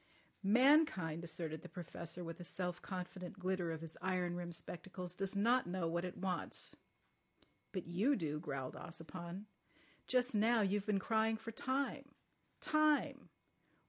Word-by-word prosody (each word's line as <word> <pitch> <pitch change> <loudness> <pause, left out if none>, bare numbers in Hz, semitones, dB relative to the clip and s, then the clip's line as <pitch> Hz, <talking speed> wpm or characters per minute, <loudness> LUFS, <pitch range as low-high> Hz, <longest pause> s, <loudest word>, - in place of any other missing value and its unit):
"Mankind," 210 - +5
asserted 160 -1 -3
the - - -9
Professor 170 0 -4
with 165 0 -6
a - - -5
self 180 0 -2
confident 185 0 -5
glitter 185 -2 0
of 160 -1 -4
his 165 -1 -6
iron 180 -2 0
rimmed 175 -1 -2
spectacles, 180 +1 -4
"does 195 +1 -1
not 235 +4 +4
know 175 -1 0
what 170 +1 0
it 180 0 -4
wants." 185 -1 -2 1.0
"But 185 -3 -3
you 200 - +3
do," 150 - -1
growled 135 -5 -3
Ossipon. 170 +3 -7 0.6
"Just 250 0 +3
now 225 +2 +4
you've 200 +1 +1
been 210 -2 +3
crying 220 +2 +2
for 225 +1 -6
time—time. 285 +4 0
185 Hz, 140 wpm, -38 LUFS, 170-215 Hz, 1.0 s, Mankind